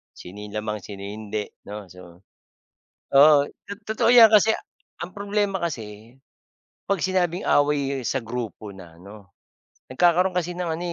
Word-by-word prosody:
Sino 95 +4 -11
yung 105 0 -9
lamang 105 0 -3
sino 100 0 -10
hindi 105 +1 -5 0.2
'no, 105 -3 -9
so 90 0 -15 0.9
Oo, 145 0 +7 0.2
to-totoo 215 +3 -1
'yan 235 -2 +9
kasi 220 0 +5 0.5
ang 180 +3 -7
problema 200 -2 -2
kasi, 115 -4 -7 0.7
'pag 200 -4 0
sinabing 185 -1 0
away 145 -2 +1
sa 130 -3 -2
grupo 115 -3 -6
na 90 -4 -14
'no, 100 +3 -14 0.6
nagkakaroon 175 +6 +3
kasi 175 0 -3
ng 175 -2 -3
ano, - - -6
135 Hz, 135 wpm, -23 LUFS, -, 0.9 s, yan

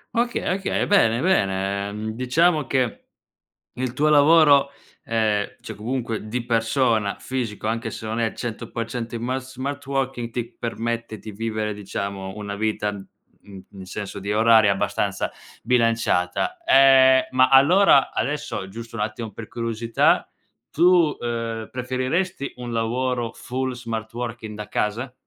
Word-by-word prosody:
Okay, 240 +1 0
okay, 195 - -1
bene, 125 - +3
bene. 100 - +1
Ehm, 105 +2 -5
diciamo 150 +6 +2
che 130 -4 -1 0.7
il 125 -1 -3
tuo 150 +3 +2
lavoro, 145 -2 +6 0.4
ehm, 110 -3 0
cioè 110 - -8
comunque 115 0 -4
di 120 +2 -3
persona, 115 -2 +1
fisico, 120 -5 -4
anche 115 +1 -1
se 110 - -8
non 110 +1 -3
è 115 -1 +1
100% 115 0 -5
in 115 - -5
mas 130 +1 -3
smart 140 +3 -4
working, 135 -3 -2
ti 120 -1 -5
permette 115 -1 -4
di 110 - -9
vivere, 110 0 -3
diciamo, 100 -1 -5
una 100 -1 -5
vita, 105 -1 -1
mhmm, 100 -1 -13
in 95 -2 -10
senso 100 +2 -6
di 100 +1 -4
oraria, 110 -1 +5
abbastanza 95 - -1 0.3
bilanciata. 115 - +1
Ehm, 130 - +6
ma 130 0 +4
allora, 140 +3 +6
adesso, 145 -8 -3
giusto 115 +3 -9
un 105 - -3
attimo 110 +1 -4
per 110 +2 -9
curiosità, 115 -1 +1 0.4
tu, 170 -2 +4
ehm, 115 -2 -4
preferiresti 130 +6 -2
un 120 -1 -6
lavoro 120 +1 -1
full 130 +1 -3
smart 115 -2 -6
working 115 -3 -5
da 105 -1 -7
casa? 120 +5 -2
115 Hz, 140 wpm, -23 LUFS, 110-130 Hz, 0.7 s, lavoro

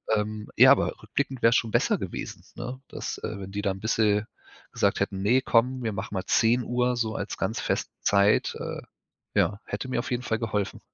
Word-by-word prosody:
Ähm, 105 0 -3
ja, 130 +3 +8
aber 140 - +2
rückblickend 135 -2 -3
wäre 115 - +6
es 120 - +2
schon 115 -2 +1
besser - - +2
gewesen, - - -6
ne? 125 +2 -6
Dass, - - -5
äh, 105 - -4
wenn 95 0 -7
die 100 +1 -4
da 100 - +1
bisschen 105 +1 +1 0.5
gesagt - - +1
hätten: 95 -1 -2
„Ne, 125 +6 +4
komm, 125 +1 +2
wir 110 - -1
machen 100 +2 -5
mal 95 -2 -3
10:00 125 +1 +2
so 110 -2 -1
als 100 - -4
ganz 100 +4 -2
feste - - -1
Zeit, 100 +1 +3
äh. - - -5 0.5
Ja, 100 0 +2
hätte 105 +5 -4
mir - - 0
auf 120 - -3
jeden 125 0 -1
Fall 115 -2 -1
geholfen. 105 -3 -2
110 Hz, 205 wpm, -26 LUFS, 105-125 Hz, 0.5 s, ja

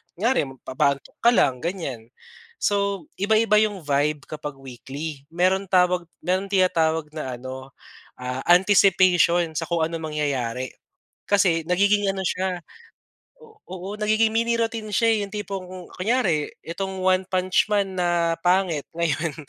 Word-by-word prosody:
Kunyari 225 - +1
magpapaantok 135 +1 -2
ka 235 - +2
lang, 125 - +3
ganyan. 160 - -4 0.6
So, 200 -4 0
iba-iba 210 +1 +3
'yong 205 -5 0
vibe 145 0 0
kapag 150 -2 -7
weekly, 135 +3 -8
mayro'n 190 +2 +1
tawag 180 -1 +2 0.2
may 185 +1 +1
tinatawag 160 -5 +1
na 140 -5 -5
ano, 130 +1 -9 0.4
ah, 125 +1 -5
anticipation 180 -2 +4
sa 160 +1 -3
kung 170 -2 0
anong 160 -1 -3
mangyayari. 130 -4 -2 0.5
Kasi, 185 -5 +2
nagiging 200 +2 +3
ano 190 -1 -3
siya 185 0 -1 0.8
o 440 -2 -18
oo, 185 0 -7
nagiging 215 +1 +2
mini 230 +1 +1
routine 225 -2 -2
siya 230 +3 +3
eh, - - +2
'yong 200 +1 -7
tipong 200 -3 -4
ku 185 +1 -9 0.2
kunyari, 185 -7 +1 0.2
itong 190 +2 -4
One 185 0 +2
Punch 185 -1 +1
Man 195 -3 0
na, 170 -1 +1
pangit 180 -4 +1
ngayon, 165 -2 -1
180 Hz, 140 wpm, -23 LUFS, 150-195 Hz, 0.8 s, anticipation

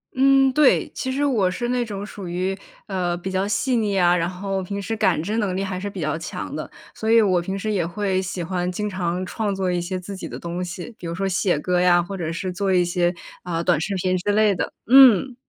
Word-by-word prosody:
嗯， 270 0 +4
对， 295 0 +4
其 260 - -3
实 280 +2 0
我 220 -10 +2
是 240 +6 -3
那 250 0 +1
种 205 -3 -5
属 200 -3 -8
于， 185 +2 -1 0.3
呃， 180 -3 -2
比 190 +2 -5
较 190 +1 0
细 215 +5 0
腻 205 -3 0
啊， 175 -1 +4
然 170 -1 0
后 195 +1 -3
平 200 +2 -4
时 200 +3 -3
感 190 -7 +2
知 215 +6 -2
能 195 -4 -1
力 195 - -1
还 190 -2 -3
是 200 +2 -4
比 195 - -8
较 155 -2 -1
强 160 - -6
的。 - - -5 0.2
所 220 0 -2
以 230 - +7
我 185 -5 +3
平 190 +3 -4
时 215 +2 -2
也 185 -5 0
会 190 +2 -1
喜 185 -1 -4
欢 180 +1 -2
经 210 +3 -3
常 185 -2 -2
创 205 +1 -2
作 190 -1 -1
一 175 -1 0
些 185 +2 -3
自 195 +2 -8
己 185 - -6
的 - - -6
东 175 +1 -4
西， 180 +5 -7
比 170 - -6
如 165 - -4
说 195 +2 -1
写 185 -2 +1
歌 180 +4 0
呀， 175 -1 +5
或 195 +3 -6
者 165 -4 -3
是 180 +3 -3
做 195 +1 -1
一 180 -1 +3
些， 175 0 +1 0.3
啊， 170 -2 -3
短 170 -3 +2
视 200 +4 -2
频 185 0 0
之 195 +3 -1
类 215 -1 +4
的。 180 - -3 0.2
嗯。 255 -1 +7
190 Hz, 270 characters per minute, -22 LUFS, 180-210 Hz, 0.3 s, 以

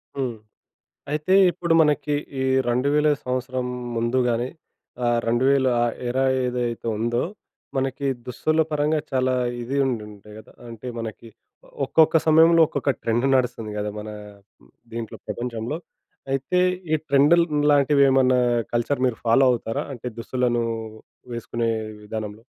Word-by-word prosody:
హ్మ్. 130 -4 -2 0.8
అయితే, 155 +5 +1 0.2
ఇప్పుడు 170 -1 -1
మనకి 150 -1 +1 0.3
ఈ - - +1 0.3
2,000 140 +5 +2 0.2
సంవత్సరం 130 0 -2 0.3
ముందు 115 +2 0
గాని 120 +2 -1 0.6
ఆహ్, 120 0 +2
2020 125 0 +1
ఏదైతే 120 -2 -3
ఉందో, 120 +2 0 0.6
మనకి 135 +1 -1 0.2
దుస్తుల 155 +5 0
పరంగా 150 +1 +1
చాలా 130 -1 +1 0.3
ఇది 125 +4 -4
ఉండుండే 105 -4 -5
కదా! - - -16 0.2
అంటే, 115 +2 -9
మనకి 115 0 -7 0.6
ఒక్కొక్క 160 0 +4
సమయంలో, 165 +1 +6
ఒక్కొక్క 140 - 0
ట్రెండ్ 120 +4 +1
నడుస్తుంది 120 -4 -1
కదా! 105 0 -2
మన 105 +1 -7 0.8
దీంట్లో 115 -2 -6
ప్రపంచంలో. 120 +5 -4 0.5
అయితే 135 +7 -1 0.4
ఈ - - +6
ట్రెండ్‌ల్లాంటివేమన్నా 140 -3 +4 0.3
కల్చర్ 120 +3 0
మీరు 125 -3 0
ఫాలో 115 +4 +5
అవుతారా 115 -2 -2
అంటే 125 -1 -7
దుస్తులను 120 0 0 0.7
వేసుకునే 115 0 -2 0.3
విధానంలో? 105 0 -6
125 Hz, 110 wpm, -23 LUFS, 115-140 Hz, 0.8 s, సమయంలో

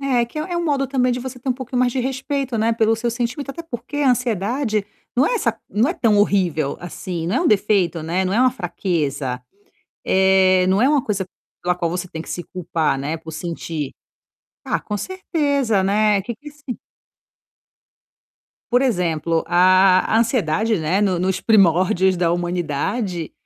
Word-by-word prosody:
É 255 -4 +1
que 240 +6 -8
é 350 +4 -4
é 345 - -1
um 345 - -1
modo 280 -3 +1
também 255 -2 +1
de 250 - -3
você 260 0 -7
ter 260 - -6
um - - +3
pouquinho 250 0 -4
mais 250 -1 +2
de 260 - -1
respeito, 265 0 -2
né, 225 +1 +2
pelo 225 0 +2
seu 235 +1 -1
sentimento, 245 +4 -3
até 335 +5 -7
porque 255 -2 -7
a 275 -3 +4
ansiedade 230 -1 0 0.3
não 260 +4 +3
é - - +1
essa 235 - 0
não 220 +8 +1
é - - 0
tão 220 -3 +2
horrível, 180 -8 +1
assim, 175 -1 -5
não 190 +8 0
é - - +2
um 350 - +1
defeito, 190 -6 +2
né, 175 +4 -1
não 185 - -1
é 225 - +2
uma 255 0 +5
fraqueza, 150 - -2 0.6
eh, 190 -1 +4
não 190 +3 +3
é 260 - +4
uma 290 -3 +3
coisa 200 -3 -1 0.4
pela 180 0 +1
qual 170 -2 -2
você 180 +1 -4
tem 160 -2 -6
que - - -11
se 175 - -4
culpar, 165 -5 -1
né, 150 +4 -3
por 160 0 -10
sentir. 160 -3 -4 0.8
Ah, - - 0
com 210 - -4
certeza, 285 - 0
né, 205 +1 +2
que 235 +4 -6
que 290 +7 -15
é - - -17
sim 285 -4 -8 1.9
Por 245 +1 +4
exemplo, 170 - 0
a 185 +1 +5
a 225 - +4
ansiedade, 220 - +1
né, 165 +5 0
no 190 -4 +1
nos 185 +1 0
primórdios 185 -2 +3
da 170 -1 +1
humanidade, 175 - -2
205 Hz, 190 wpm, -21 LUFS, 175-250 Hz, 1.9 s, uma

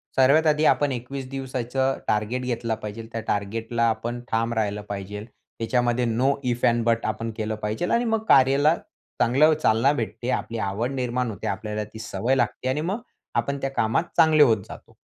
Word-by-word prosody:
सर्वात 140 +5 +5
आधी 150 0 +3
आपण 145 -1 +1
21 130 +2 -5
दिवसाचं 130 0 -2
टार्गेट 110 +4 0
घेतला 120 -2 -2
पाहिजे 105 +2 -6
त्या 115 - -3
टार्गेटला 115 +3 -1
आपण 120 +2 -3
ठाम 115 +1 +1
राहिलं 105 -2 -1
पाहिजे 100 +1 -5
त्याच्यामध्ये 120 +1 -2
नो 125 +4 +2 0.2
इफ 120 0 -4
एंड 120 0 +3
बट 115 0 +1
आपण 115 0 -2
केलं 110 -1 -2
पाहिजे 105 +10 -1
आणि 235 +1 +2
मग 225 -1 0
कार्याला 140 +4 +5 0.5
चांगलं 145 +7 +5
चालना 135 -3 +3
भेटते. 120 -1 -4
आपली 115 -2 -2
आवड 110 +5 -2
निर्माण 125 -2 -1
होते, 100 - -6
आपल्याला 105 +2 -3
ती 110 +1 -11
सवय 115 +3 -1
लागते 125 0 -1
आणि 140 +4 0
मग 195 +8 -2 0.3
आपण 120 +4 0
त्या 135 - -1
कामात 115 +2 +1
चांगले 160 -2 +6
होत 110 -7 +3
जातो. - - -12
120 Hz, 175 wpm, -24 LUFS, 110-135 Hz, 0.5 s, चांगले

